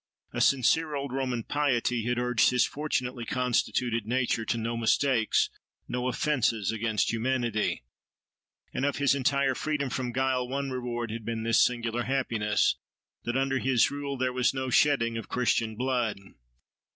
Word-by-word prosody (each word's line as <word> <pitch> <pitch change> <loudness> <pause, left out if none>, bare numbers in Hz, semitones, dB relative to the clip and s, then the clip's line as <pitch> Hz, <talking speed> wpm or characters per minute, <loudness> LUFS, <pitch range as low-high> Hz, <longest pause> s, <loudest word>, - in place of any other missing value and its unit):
A - - -1
sincere 150 +4 +3
old 140 -2 -4
Roman 130 -3 -2
piety 125 -5 0
had 120 0 0
urged 125 -1 +3
his 125 -1 +3
fortunately 125 -5 -3
constituted 120 -2 0
nature 125 -2 0
to 115 - -1
no 115 +1 -2
mistakes, 115 0 +2 0.4
no 125 0 -2
offences 125 - 0
against 110 -1 0
humanity. 115 - -1 0.9
And - - -2
of 145 0 +1
his 140 -1 +3
entire 140 0 +1
freedom 140 -1 -2
from 130 -3 -2
guile 130 0 0
one 135 +1 -3
reward 120 -2 -3
had 115 0 -5
been 115 0 -3
this 115 0 +4
singular 120 -1 -1
happiness, 115 -6 +1 0.5
that 120 +2 -1
under 135 0 +1
his 130 -3 +3
rule 140 -1 -4
there 130 0 0
was 125 +1 +1
no 130 -1 -2
shedding 115 -2 +3
of - - -10
Christian 115 -3 0
blood. 125 -3 -1
125 Hz, 150 wpm, -28 LUFS, 115-135 Hz, 0.9 s, this